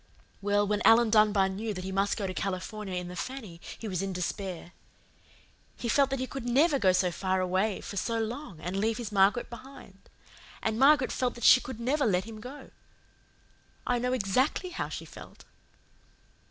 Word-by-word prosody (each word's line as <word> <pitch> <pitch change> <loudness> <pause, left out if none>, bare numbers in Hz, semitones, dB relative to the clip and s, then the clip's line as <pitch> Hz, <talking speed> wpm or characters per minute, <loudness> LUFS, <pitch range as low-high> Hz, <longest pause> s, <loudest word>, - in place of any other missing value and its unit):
"Well, 205 +1 +2
when 205 0 0
Alan 225 0 +6
Dunbar 210 -3 +4
knew 205 +3 -4
that 185 - -5
he 190 - -4
must 195 +1 0
go 205 - -2
to 185 - -3
California 195 +1 -4
in 180 0 -3
the 180 - -8
Fanny 210 -6 -6 0.2
he 225 - -7
was 185 -3 -2
in 195 -1 -3
despair. 180 -1 -4 1.1
He 240 - -4
felt 275 +3 +3
that 270 - -1
he 260 - -2
could 270 0 -7
NEVER 280 +5 +3
go 190 -5 +4
so 180 -1 +2
far 185 +1 -1
away 185 +3 0
for 200 - -7
so 230 +4 -1
long 225 - -5
and 180 +4 -4
leave 220 +2 0
his 235 -4 -5
Margaret 200 +4 +3
behind. 250 -5 -13 0.5
And 220 0 -1
Margaret 275 0 +5
felt 250 -1 -1
that 235 - -9
she 255 - +8
could 260 -3 -8
never 270 +3 +1
let 185 -2 +2
him 225 -1 -9
go. 265 +6 -10 1.1
I 245 -1 +1
know 250 +1 -1
EXACTLY 255 - 0
how - - -3
she - - -6
felt." - - -13
215 Hz, 190 wpm, -29 LUFS, 190-250 Hz, 1.1 s, she